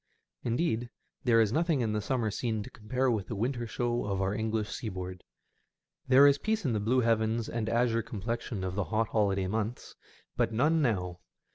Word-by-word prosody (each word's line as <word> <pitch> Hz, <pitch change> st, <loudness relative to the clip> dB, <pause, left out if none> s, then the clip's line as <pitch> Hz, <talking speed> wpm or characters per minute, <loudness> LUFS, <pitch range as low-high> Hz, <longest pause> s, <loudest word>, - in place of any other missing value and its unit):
Indeed, 120 Hz, -1 st, 0 dB, 0.4 s
there 115 Hz, -2 st, +5 dB
is 110 Hz, -1 st, +3 dB
nothing 160 Hz, -3 st, +2 dB
in 110 Hz, -2 st, 0 dB
the 105 Hz, -, 0 dB
summer 110 Hz, 0 st, -1 dB
scene 110 Hz, 0 st, -2 dB
to -, -, -11 dB
compare 125 Hz, +4 st, 0 dB
with 105 Hz, -5 st, -1 dB
the 115 Hz, -, -4 dB
winter 120 Hz, +3 st, -1 dB
show 120 Hz, +1 st, -1 dB
of 100 Hz, -2 st, -1 dB
our 95 Hz, +1 st, 0 dB
English 110 Hz, 0 st, -1 dB
seaboard. 95 Hz, -4 st, -5 dB, 0.8 s
There 130 Hz, +2 st, +7 dB
is 140 Hz, 0 st, +5 dB
peace 220 Hz, -3 st, -1 dB
in 125 Hz, -, +1 dB
the 105 Hz, -, +1 dB
blue 120 Hz, +5 st, +2 dB
heavens 115 Hz, -1 st, +1 dB
and 110 Hz, -2 st, -2 dB
azure 115 Hz, 0 st, +2 dB
complexion 110 Hz, -1 st, -4 dB
of 95 Hz, -1 st, -2 dB
the 100 Hz, 0 st, -1 dB
hot 110 Hz, 0 st, 0 dB
holiday 100 Hz, -3 st, +1 dB
months, 110 Hz, +4 st, -3 dB, 0.4 s
but -, -, +1 dB
none 150 Hz, +8 st, +3 dB
now. 90 Hz, -9 st, 0 dB
115 Hz, 185 wpm, -30 LUFS, 105-120 Hz, 0.8 s, There